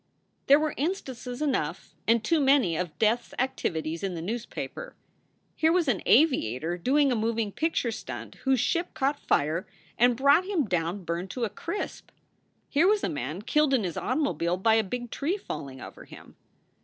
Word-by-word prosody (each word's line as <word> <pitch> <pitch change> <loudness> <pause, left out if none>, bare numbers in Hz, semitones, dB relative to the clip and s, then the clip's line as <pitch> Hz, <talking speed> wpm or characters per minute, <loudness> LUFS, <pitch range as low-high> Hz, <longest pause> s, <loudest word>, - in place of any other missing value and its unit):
There 280 - +8
were 310 0 -1
instances 265 -5 -3
enough 280 -4 -2
and 230 -1 +3
too 330 +6 +2
many 270 - +4
of 160 -3 -3
death 225 +5 +3
s - - -19
activities 165 -10 -2
in 190 -2 -3
the 165 - -5
newspaper. 240 - -5 0.6
Here 320 0 +3
was 345 -2 +2
an 230 -8 +1
aviator 170 - +3
doing 270 - +2
a - - +2
moving 225 -1 -1
picture 315 -3 0
stunt - - -7
whose 265 -2 +3
ship 340 +9 0
caught 280 +2 0
fire 160 +6 0 0.3
and 245 0 +4
brought 280 +7 +5
him 370 -8 0
down 180 0 -1
burned 170 +2 -3
to 245 +5 -4
a 220 - -1
crisp. 340 +5 -5 0.6
Here 310 +5 +3
was 420 0 +3
a - - +1
man 150 +7 -4
killed 300 +3 +3
in 235 - +1
his 175 -4 -3
automobile 245 - 0
by 220 +4 +3
a 220 0 +4
big 240 +4 -5
tree 330 +8 -1
falling 140 - -7
over - - -10
him. - - -14
240 Hz, 180 wpm, -27 LUFS, 180-290 Hz, 0.6 s, There